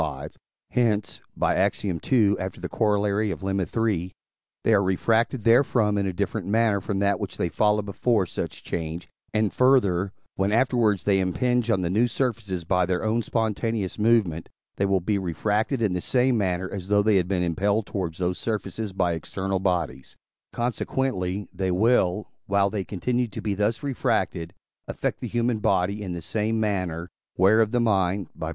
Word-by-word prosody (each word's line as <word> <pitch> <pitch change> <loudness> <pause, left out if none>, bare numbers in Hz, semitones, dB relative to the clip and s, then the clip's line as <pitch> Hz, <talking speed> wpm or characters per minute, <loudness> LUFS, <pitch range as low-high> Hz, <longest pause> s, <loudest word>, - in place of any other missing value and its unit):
v.); 75 -2 -4 0.4
hence 110 -4 0 0.2
(Ax. - - +1
ii., 100 +3 +2
after 95 -1 -5
the - - -4
Coroll. 105 -1 +1
of - - -6
Lemma 95 +3 -1
iii.) 90 -4 -1 0.5
they 115 - +3
are 100 - +5
refracted 110 +5 +1
therefrom 115 -2 +3
in 100 -1 0
a - - 0
different 100 +2 -3
manner 110 -1 +2
from 100 +1 -3
that 100 0 +1
which 100 -3 -5
they 85 - 0
followed 105 +2 +2
before 105 +1 +1
such - - -5
change; 80 +1 -4 0.2
and, 110 -1 0
further, 100 -8 +3 0.2
when 95 +1 0
afterwards 115 -5 +2
they 100 -1 +3
impinge 120 +6 0
on 100 -5 +2
the 85 - -1
new 115 +5 +3
surfaces 115 -8 -2
by 90 +2 +2
their 90 0 -1
own 110 +2 +1
spontaneous 110 -2 -2
movement, 105 -8 +2 0.3
they 100 - +1
will 95 -1 +2
be 100 +3 0
refracted 105 - -1
in 100 -4 +1
the 90 - -2
same 125 +3 +2
manner, 95 -3 0
as 95 -2 -6
though 105 0 +3
they 105 -1 +4
had 90 -2 +1
been 90 -2 0
impelled 100 +5 0
towards 85 -5 -4
those 90 0 -1
surfaces 110 -2 -3
by 90 -2 +1
external 95 +3 -3
bodies; 85 -8 -2 0.4
consequently, 110 -5 -2
they 95 0 -2
will, 105 0 +2 0.2
while 100 0 +2
they 100 -3 -2
continue 120 +6 -1
to 105 - -8
be 105 - -1
thus 105 +4 -1
refracted, 110 -11 -1 0.4
affect - - -3
the - - -4
human 120 -1 0
body 100 +1 +1
in 95 -3 -4
the 85 -2 -6
same 110 +4 -1
manner, 90 -5 -2 0.3
whereof 110 +4 +5
the 120 +2 0
mind 100 -4 +1 0.2
(II. 80 - -2
100 Hz, 175 wpm, -25 LUFS, 95-110 Hz, 0.5 s, are